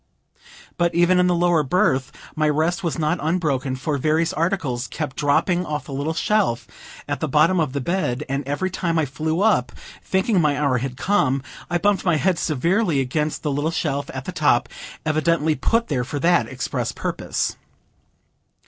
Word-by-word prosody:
But 170 -1 +1
even 175 +1 +4
in 180 - +4
the 180 - +2
lower 175 -2 +3
berth, 135 -4 +1 0.2
my 155 -1 +2
rest 160 +6 0
was 170 - -1
not 155 +2 0
unbroken, 150 -5 0
for 140 +2 -2
various 160 +4 +1
articles 155 -8 -1
kept 150 -4 -5
dropping 175 +5 +2
off 150 -3 -4
the 140 - -8
little 145 +4 -2
shelf 200 - +1 0.4
at - - -2
the - - -1
bottom 155 +6 +3
of 150 -5 0
the 140 - -2
bed, 150 -4 -1
and 140 +1 -2
every 165 +7 -1
time 170 -2 -1
I 160 - +2
flew 155 +5 -2
up, 205 - +2 0.3
thinking 190 0 +1
my 150 -3 +2
hour 140 -4 +2
had 125 0 -4
come, 140 -10 +1 0.3
I 175 - +1
bumped 205 +2 +1
my 175 -3 +2
head 175 +2 +1
severely 170 - +1
against 150 +4 -1
the 150 - 0
little 145 +3 0
shelf 145 -3 -2
at 130 0 -6
the - - -4
top, 145 -8 +2 0.4
evidently 155 0 +2
put 230 - +1
there 130 -5 -1
for 130 +4 -5
that 155 -6 +3
express - - -3
purpose. - - -2
155 Hz, 180 wpm, -22 LUFS, 140-175 Hz, 0.4 s, even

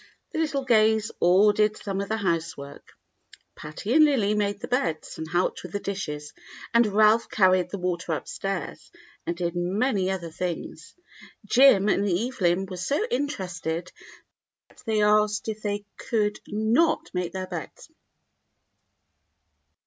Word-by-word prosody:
The - - -3
little 290 -4 -1
Gays 220 -2 +3
all 190 +4 +5
did 210 0 +1
some 195 -1 -3
of 200 - -5
the 220 - 0
housework. 165 -7 -4 0.6
Patty 155 +9 -5
and 310 +2 +7
Lily 245 -9 +3
made 205 -1 -1
the - - -6
beds 170 - -2
and 160 0 -5
helped 175 +2 0
with 180 - -10
the 205 - -1
dishes, 150 -8 -5 0.4
and 235 -1 +5
Ralph 215 +2 +4
carried 185 -3 +3
the 200 - -5
water 180 -2 -2
upstairs, 195 +4 -5 0.4
and 170 - -2
did 175 -1 -2
many 190 +3 0
other 175 -4 -4
things. 165 -1 -5 0.5
Jim 210 -3 +5
and 205 0 +2
Evelyp 190 -2 0
were 185 - -5
so 280 - 0
interested 180 - -3 0.8
that - - -19
they 215 -1 +2
asked 210 0 +2
if 215 -1 -4
they 205 -1 -3
could 210 -2 -1
not 220 +10 +1
make 180 -2 -2
their 190 -1 -3
beds. 180 - -8
200 Hz, 140 wpm, -25 LUFS, 175-220 Hz, 0.8 s, and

